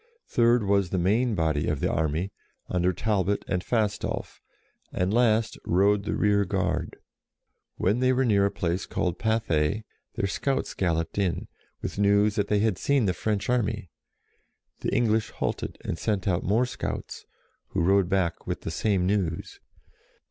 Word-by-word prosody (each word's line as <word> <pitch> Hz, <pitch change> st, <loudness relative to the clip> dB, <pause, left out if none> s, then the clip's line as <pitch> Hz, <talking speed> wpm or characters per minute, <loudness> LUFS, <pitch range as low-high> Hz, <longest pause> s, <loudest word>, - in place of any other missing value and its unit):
Third 120 Hz, -1 st, +3 dB
was 100 Hz, -2 st, +2 dB
the 95 Hz, -, -1 dB
main 110 Hz, +6 st, +2 dB
body 80 Hz, -3 st, 0 dB
of 75 Hz, -, 0 dB
the -, -, 0 dB
army, 80 Hz, +5 st, -1 dB, 0.4 s
under 90 Hz, 0 st, +1 dB
Talbot 100 Hz, +1 st, 0 dB
and 90 Hz, -1 st, -1 dB
Fastolf; 110 Hz, -3 st, -2 dB, 0.5 s
and 90 Hz, +2 st, 0 dB
last 115 Hz, -2 st, +2 dB
rode 100 Hz, +3 st, +2 dB
the -, -, -1 dB
rear 100 Hz, -1 st, +3 dB
guard. 90 Hz, -5 st, -2 dB, 0.8 s
When 105 Hz, +6 st, +1 dB
they 130 Hz, 0 st, +3 dB
were 130 Hz, +1 st, +2 dB
near 100 Hz, -4 st, +4 dB
a -, -, -3 dB
place 90 Hz, +1 st, -2 dB
called 90 Hz, -3 st, -2 dB
Pathay, 110 Hz, -4 st, +1 dB, 0.3 s
their -, -, 0 dB
scouts 135 Hz, +7 st, -1 dB
galloped 85 Hz, 0 st, -1 dB
in, 95 Hz, -4 st, -1 dB, 0.4 s
with -, -, -4 dB
news 100 Hz, +1 st, +4 dB
that 105 Hz, -1 st, 0 dB
they 105 Hz, -1 st, +2 dB
had 110 Hz, -4 st, +1 dB
seen 140 Hz, -5 st, +2 dB
the 90 Hz, -, +1 dB
French 105 Hz, +5 st, -2 dB
army. 110 Hz, -7 st, -1 dB, 0.9 s
The -, -, -2 dB
English 110 Hz, -2 st, +1 dB
halted, -, -, -3 dB
and 80 Hz, -, -3 dB
sent 105 Hz, -4 st, -1 dB
out 90 Hz, -2 st, +1 dB
more 110 Hz, +6 st, +2 dB
scouts, 125 Hz, -, -5 dB, 0.4 s
who -, -, -1 dB
rode 95 Hz, 0 st, +3 dB
back 90 Hz, -4 st, 0 dB
with -, -, -3 dB
the -, -, -4 dB
same 100 Hz, -4 st, +1 dB
news. 95 Hz, -4 st, -1 dB
100 Hz, 160 wpm, -26 LUFS, 90-110 Hz, 0.9 s, near